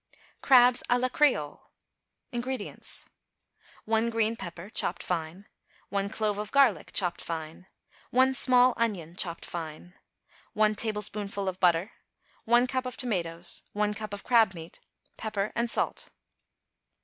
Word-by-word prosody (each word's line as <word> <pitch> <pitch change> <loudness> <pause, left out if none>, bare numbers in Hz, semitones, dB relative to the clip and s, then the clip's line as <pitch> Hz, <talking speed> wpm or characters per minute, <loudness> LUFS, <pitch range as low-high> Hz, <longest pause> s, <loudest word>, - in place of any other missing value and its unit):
=Crabs 250 -2 +6
à 245 - +4
la 255 +1 0
Creole.= 245 - +1 0.7
INGREDIENTS. 245 -2 -2 0.8
1 225 +1 +1
green 225 0 +1
pepper, 175 -3 -8
chopped 180 - -2
fine. 175 +3 -4 0.4
1 200 0 -1
clove 210 -1 -1
of 210 0 -5
garlic, 275 -2 +3
chopped 180 -3 -1
fine. 165 +2 -6 0.4
1 260 +1 +4
small 250 -1 +5
onion, 185 -8 -2
chopped 170 -2 -1
fine. 165 +1 -7 0.6
1 215 0 +3
tablespoonful 210 -2 -3
of 185 0 -3
butter. 175 +2 +3 0.5
1 240 +2 +4
cup 255 0 -2
of 250 - -5
tomatoes. 175 -8 -2
1 210 0 0
cup 215 -1 -6
of 205 0 -6
crab 225 -6 +4
meat. 165 0 -10 0.4
Pepper 215 -2 -3
and 235 0 0
salt. - - +1
210 Hz, 130 wpm, -28 LUFS, 180-240 Hz, 0.8 s, =Crabs